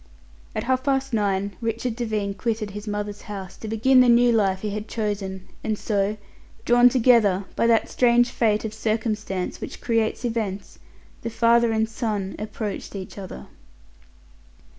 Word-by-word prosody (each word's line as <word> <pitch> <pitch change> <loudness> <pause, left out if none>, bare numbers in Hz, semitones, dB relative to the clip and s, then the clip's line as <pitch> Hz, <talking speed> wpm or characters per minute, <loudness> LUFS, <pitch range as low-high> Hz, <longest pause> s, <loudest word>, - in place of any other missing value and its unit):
At - - -1
half 260 +1 0
past 270 -1 0
nine 200 -2 0
Richard 230 +1 -2
Devine 215 -4 -2
quitted 220 -1 -2
his 210 +2 -8
mother's 205 0 -4
house 195 -3 -7
to 220 - -8
begin 230 +5 +4
the 250 -1 +6
new 240 0 +6
life 195 -4 +2
he 210 - -3
had 210 +1 -5
chosen, 200 -4 -3 0.2
and 215 -1 -1
so, 205 0 0 0.5
drawn 245 +1 +6
together 225 -6 +4
by 230 - +2
that 225 -2 +3
strange 240 0 +3
fate 215 -2 +1
of 220 - -4
circumstances 215 -4 -2
which - - -7
creates 230 0 0
events, 215 -4 -3 0.4
the 230 - -3
father 235 0 +3
and 220 0 +1
son 215 -4 -3
approached 210 -1 -5
each 195 +1 -7
other. 185 - -8
220 Hz, 155 wpm, -24 LUFS, 205-235 Hz, 0.5 s, the